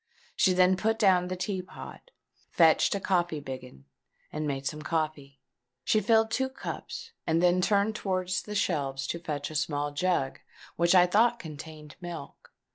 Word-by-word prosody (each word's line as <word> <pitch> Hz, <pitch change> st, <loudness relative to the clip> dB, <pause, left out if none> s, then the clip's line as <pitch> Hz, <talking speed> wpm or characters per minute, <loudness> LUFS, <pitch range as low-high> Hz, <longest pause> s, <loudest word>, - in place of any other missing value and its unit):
She 185 Hz, -, +4 dB
then 185 Hz, +1 st, +4 dB
put 220 Hz, +3 st, +1 dB
down 185 Hz, -5 st, +4 dB
the 185 Hz, -, -3 dB
tea 185 Hz, +1 st, -2 dB
pot, 185 Hz, -, -11 dB, 0.4 s
fetched 165 Hz, +3 st, +4 dB
a -, -, -1 dB
coffee 175 Hz, -5 st, 0 dB
biggin, 130 Hz, -, -9 dB, 0.5 s
and 155 Hz, 0 st, -2 dB
made 135 Hz, -1 st, -3 dB
some 150 Hz, +2 st, -3 dB
coffee. 150 Hz, -4 st, -3 dB, 0.4 s
She 215 Hz, -, +3 dB
filled 225 Hz, +2 st, +3 dB
two 265 Hz, +3 st, 0 dB
cups, 265 Hz, -, -7 dB, 0.2 s
and 165 Hz, 0 st, +2 dB
then 180 Hz, +1 st, +3 dB
turned 205 Hz, +2 st, +2 dB
towards 185 Hz, -2 st, -1 dB
the 210 Hz, -, -7 dB
shelves 140 Hz, -8 st, -1 dB
to 170 Hz, -, -3 dB
fetch 150 Hz, -3 st, -4 dB
a -, -, -8 dB
small 145 Hz, -1 st, -1 dB
jug, 145 Hz, -3 st, 0 dB, 0.4 s
which 170 Hz, +2 st, +3 dB
I 180 Hz, -1 st, +8 dB
thought 230 Hz, +6 st, +3 dB
contained 155 Hz, -3 st, -10 dB
milk. 170 Hz, -5 st, -9 dB
175 Hz, 165 wpm, -28 LUFS, 150-190 Hz, 0.5 s, I